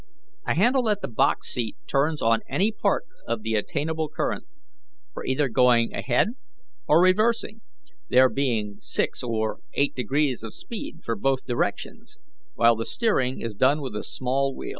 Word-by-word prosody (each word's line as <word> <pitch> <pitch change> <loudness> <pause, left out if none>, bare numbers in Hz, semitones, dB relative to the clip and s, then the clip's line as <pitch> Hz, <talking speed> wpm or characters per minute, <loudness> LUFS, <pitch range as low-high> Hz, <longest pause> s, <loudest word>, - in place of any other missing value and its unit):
A - - +1
handle 245 +5 +3
at 205 -1 0
the - - -1
box 110 - +1
seat 115 -3 -3
turns 150 +3 0
on 115 0 +4
any 205 +4 +2
part 205 -2 0 0.2
of 115 -2 -2
the 110 0 -2
attainable 155 - -1
current, 155 - -3 0.7
for - - -6
either 135 +2 +1
going 120 -1 +3
ahead 125 - +1 0.6
or 165 +4 +5
reversing, 215 +3 +2 0.5
there 130 +1 +6
being 115 -7 -1
six - - -2
or 110 -3 -2 0.2
eight 140 - +2
degrees 135 0 0
of 110 -1 -7
speed 205 -7 -8
for 115 - -2
both 135 +5 0
directions, 120 -2 -3 0.4
while 115 0 +5
the 115 0 -4
steering 135 - +1
is 115 -2 -4
done 130 +8 +3
with 130 -7 -6
a 105 - -3
small 135 +1 -1
wheel. - - -6
130 Hz, 160 wpm, -25 LUFS, 115-160 Hz, 0.7 s, there